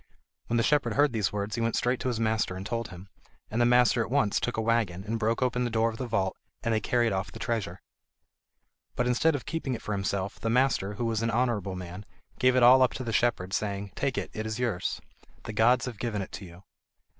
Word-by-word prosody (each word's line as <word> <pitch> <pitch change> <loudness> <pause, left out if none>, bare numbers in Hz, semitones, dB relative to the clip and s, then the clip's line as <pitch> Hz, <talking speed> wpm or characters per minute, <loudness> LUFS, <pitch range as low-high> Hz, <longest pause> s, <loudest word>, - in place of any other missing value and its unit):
When 120 - +1
the 115 - +3
shepherd 150 +2 +2
heard 145 -2 +3
these 105 -5 0
words 105 0 -3
he 115 - -2
went 115 0 0
straight 125 +1 +1
to - - -3
his 120 -3 -1
master 110 -4 0
and 95 +1 -6
told 115 +1 -2
him, 90 +1 -11 0.4
and 115 +3 0
the 120 - +5
master 125 -1 +4
at 115 - -3
once 120 -6 +2
took 120 - -2
a - - +1
waggon, 110 -5 0
and 115 +2 -3
broke 115 +3 +1
open 125 -1 0
the 120 - 0
door 115 0 +1
of 110 - -9
the 125 - -4
vault, 95 -4 0 0.3
and 115 - +1
they 110 - +2
carried 120 +2 +1
off 95 0 -2
the - - -9
treasure. 110 -6 -3 1.2
But 125 - 0
instead 135 +6 +2
of 140 - -5
keeping 150 -6 -2
it 115 - -8
for - - -4
himself, 100 -1 -2
the 115 - -2
master, 120 -5 +2
who 120 - -2
was 115 -1 0
an 115 - 0
honourable 115 -5 0
man, 90 +3 -8 0.3
gave 130 0 +4
it 130 - +4
all 130 +2 +8
up 130 - +4
to 130 - -5
the 115 -2 -3
shepherd, 100 -6 +1
saying: 100 -1 -2
"Take 140 -2 -2
it, - - -3
it 110 0 -4
is 110 0 -3
yours. 120 -8 -2 0.4
The 110 - -6
gods 120 +5 +4
have 120 -5 -6
given 105 -4 -2
it - - -11
to 100 - -7
you." 85 +2 -14
115 Hz, 250 wpm, -28 LUFS, 100-125 Hz, 1.2 s, all